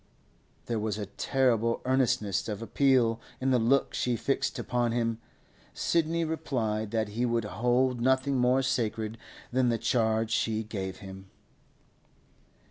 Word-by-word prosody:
There 115 -2 -1
was 105 -1 -2
a 105 - -3
terrible 115 +2 +1
earnestness 115 -7 +1
of 105 +1 -4
appeal 120 -3 +2 0.2
in 130 +1 +1
the 125 - +4
look 125 +4 +2
she 125 -1 0
fixed - - -1
upon 120 -1 0
him. 115 -1 -1 0.6
Sidney 165 0 +1
replied 115 -9 -2
that 110 -1 -1
he 115 +4 -2
would 115 -2 0
hold 125 +3 +1
nothing 130 +2 +2
more 125 +2 +3
sacred 115 -3 -1 0.3
than 130 -1 +3
the 115 - +1
charge 110 -2 +1
she 110 0 0
gave 95 -3 -5
him. 95 0 -10
115 Hz, 135 wpm, -29 LUFS, 110-130 Hz, 0.6 s, the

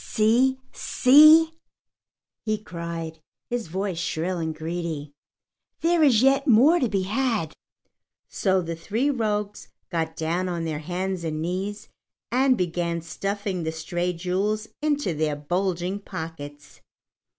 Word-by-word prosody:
"See, 245 +4 +2
see!" 310 +5 +6 0.9
he 215 -1 0
cried, 170 -5 -6 0.3
his 240 -4 -2
voice 190 +1 -3
shrill 175 0 -2
and 160 -1 -3
greedy. 160 -2 -4 0.7
"There 340 0 +3
is 255 -6 +5
yet 275 +2 +3
more 275 +9 +6
to 250 - +1
be 195 -2 0
had!" 215 -5 -1 0.7
So 190 -2 +1
the 165 0 -4
three 225 - -1
rogues 210 -5 -2 0.2
got 160 -2 -2
down 170 +4 -1
on 170 -2 -3
their 155 -2 -3
hands 180 +3 -3
and 155 -1 -3
knees 190 +5 -3 0.4
and 255 +1 +3
began 170 -2 -1
stuffing 195 +3 -3
the 160 -1 -2
stray 175 +3 -2
jewels 190 +5 -1
into 290 - 0
their 155 -1 -1
bulging 180 +5 -2
pockets. 160 -6 -8
185 Hz, 130 wpm, -25 LUFS, 165-220 Hz, 0.9 s, see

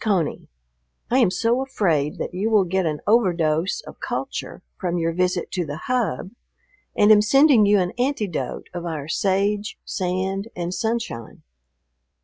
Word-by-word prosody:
CONEY,... 190 -8 0 0.6
I 255 - +4
am 235 - +5
so 230 +7 +1
afraid 170 - 0
that - - -4
you 195 +5 -1
will 215 -3 +4
get 185 0 0
an 150 -1 -3
overdose 180 - +2
of - - -13
culture - - -5 0.2
from 175 -2 -1
your 165 0 0
visit 180 +1 0
to 180 - -1
the 145 -2 -5
Hub 210 - -2 0.7
and 210 +1 +6
am 210 -1 +7
sending 265 -1 +5
you 205 0 +5
an 180 -2 0
antidote 245 - -2
of 175 -1 -5
our 150 -3 -4
sage, 200 +4 0
sand, 190 +2 -2
and 175 0 -3
sunshine. 220 - -3
190 Hz, 150 wpm, -23 LUFS, 170-220 Hz, 0.7 s, am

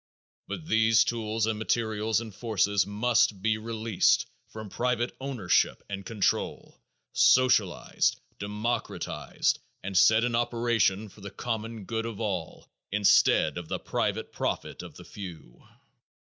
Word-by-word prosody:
But 160 - -6
these 110 -5 +4
tools 110 -1 -1
and 110 -1 -2
materials 110 -1 0
and 110 -3 -8
forces 100 -2 +1
must 105 -1 +2
be 110 0 +1
released 110 -2 +1 0.2
from 110 -1 -8
private 120 +3 -1
ownership 130 -9 +1
and 100 -1 -5
control, 105 0 -2 0.3
socialized, 125 -8 +3 0.2
democratized, 105 +4 -2 0.2
and 95 +1 -5
set 110 +5 +6
in 120 -1 0
operation 115 -4 +1
for 105 +1 -17
the 100 - -7
common 110 0 -5
good 115 +2 -3
of 115 -3 -7
all 95 -7 -4 0.2
instead 100 -6 +4
of 85 - -9
the - - -2
private - - -2
profit - - -3
of - - -11
the - - -12
few. 85 - -10
110 Hz, 130 wpm, -28 LUFS, 100-115 Hz, 0.3 s, set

